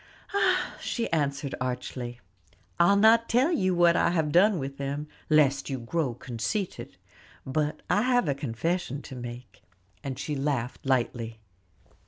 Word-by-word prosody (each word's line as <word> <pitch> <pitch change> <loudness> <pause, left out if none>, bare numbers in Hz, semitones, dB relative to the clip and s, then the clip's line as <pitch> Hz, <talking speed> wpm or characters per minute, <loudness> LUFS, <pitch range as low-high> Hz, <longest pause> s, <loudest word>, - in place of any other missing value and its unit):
"Ah!" 405 - +1
she 235 - -2
answered 140 -2 0
archly, 125 -1 -4 0.6
"I'll 175 +4 +6
not 225 +3 +5
tell 255 +8 +3
you 185 - +1
what 170 -1 +5
I - - +3
have 160 -4 0
done 190 +5 +5
with 140 -2 -5
them, 140 +2 -3 0.2
lest 145 -3 +3
you 135 - -2
grow 125 +1 -2
conceited. 120 - -4 0.5
But 150 +3 -1
I 200 +4 +3
have 245 -4 +2
a 140 - +2
confession 140 +3 -2
to 135 - -9
make," 120 0 -9 0.4
and 135 -3 -4
she 150 - -3
laughed 135 -1 -2
lightly. 120 -3 0
145 Hz, 145 wpm, -27 LUFS, 125-175 Hz, 0.6 s, I'll